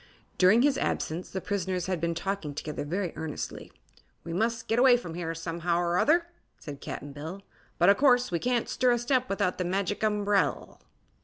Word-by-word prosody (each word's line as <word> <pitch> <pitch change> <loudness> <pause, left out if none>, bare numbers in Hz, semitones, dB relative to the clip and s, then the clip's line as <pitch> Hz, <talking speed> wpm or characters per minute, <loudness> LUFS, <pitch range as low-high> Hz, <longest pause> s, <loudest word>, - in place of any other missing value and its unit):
During 205 +7 +6
his 280 -1 +2
absence 165 +3 -2
the 190 - -4
prisoners 185 -3 -2
had 185 -3 -2
been 170 0 0
talking 170 -4 -3
together 150 0 -4
very 175 +4 -2
earnestly. 160 -2 -6 0.5
"We 165 - -6
must 225 +5 -1
get 225 - +1
away 250 -1 +7
from 175 -9 -7
here, 165 -1 -4
somehow 170 +1 -2
'r 175 0 +1
other," 335 +3 +3 0.3
said 140 -2 -9
Cap'n 145 - -6
Bill; 160 +7 -7 0.3
"but 175 - +4
o' 200 - +8
course 250 0 +3
we 170 - 0
can't 245 +1 0
stir 255 - +1
a - - +1
step 250 +1 0
without 195 -2 0
the - - +1
Magic 195 +2 -1
Umbrel." 205 -1 0
190 Hz, 185 wpm, -28 LUFS, 170-230 Hz, 0.5 s, o